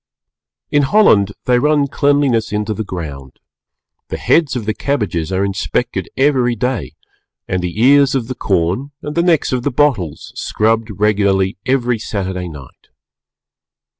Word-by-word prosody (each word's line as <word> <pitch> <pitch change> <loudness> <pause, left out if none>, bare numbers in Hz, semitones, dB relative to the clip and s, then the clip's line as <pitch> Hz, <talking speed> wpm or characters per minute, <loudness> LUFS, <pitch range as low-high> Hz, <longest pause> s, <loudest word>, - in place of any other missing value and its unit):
In 145 - +4
Holland 135 - +4
they 125 -1 +3
run 150 +1 +2
cleanliness 140 -6 +1
into 105 +1 -1
the 110 - -4
ground, 70 -9 -7 0.7
the - - -4
heads 155 -5 +2
of 120 -4 -3
the 110 - 0
cabbages 95 - -2
are 95 +1 +1
inspected 100 +5 -2
every 130 -3 +2
day 125 - -2 0.5
and 90 - -1
the 90 +3 -4
ears 140 +2 +5
of 120 -4 -1
the 130 - -3
corn 95 +3 -1
and 150 - -4
the 170 - +1
necks 170 -3 +2
of 125 - 0
the - - 0
bottles 120 - 0
scrubbed 110 +1 0
regularly 100 -2 +1
every 125 -3 +1
Saturday 95 -4 -4
night. 70 -5 -13
115 Hz, 145 wpm, -17 LUFS, 95-135 Hz, 0.7 s, ears